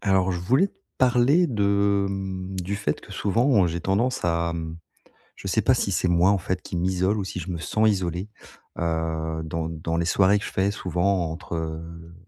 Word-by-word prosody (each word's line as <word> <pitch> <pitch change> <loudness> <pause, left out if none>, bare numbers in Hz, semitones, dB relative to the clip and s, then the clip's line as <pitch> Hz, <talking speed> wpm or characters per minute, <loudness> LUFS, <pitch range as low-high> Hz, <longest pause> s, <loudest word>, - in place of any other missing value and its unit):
Alors 95 -1 +3
je 90 - -2
voulais 130 - +3
te - - -27 0.2
parler 130 +7 +4
de, 100 -5 +2
hem, 95 -1 -4
du 95 +3 -3
fait 100 +1 -2
que - - -14
souvent 105 +1 +2
j'ai 85 +1 -3
tendance 100 +5 0
à, 85 0 +1
hem, 80 -1 -5 0.6
je - - -11
sais - - +2
pas - - +4
si - - -1
c'est 90 - +1
moi, 90 +2 +4
en 100 - +3
fait, 95 0 -3
qui - - -7
m'isole 95 +4 +1
ou 100 - -2
si 95 - -5
je 90 +1 -5
me 85 - -3
sens 110 +6 +1
isolé. 95 -1 -1 0.5
Heu, 80 -1 -2
dans 80 +1 -3
dans 80 0 -3
les 85 - 0
soirées 95 +3 +4
que 105 - -7
je - - -6
fais 95 +1 +1
souvent 90 -2 0
entre, 80 +1 -6
heu, 85 +1 -6
95 Hz, 205 wpm, -25 LUFS, 85-100 Hz, 0.6 s, parler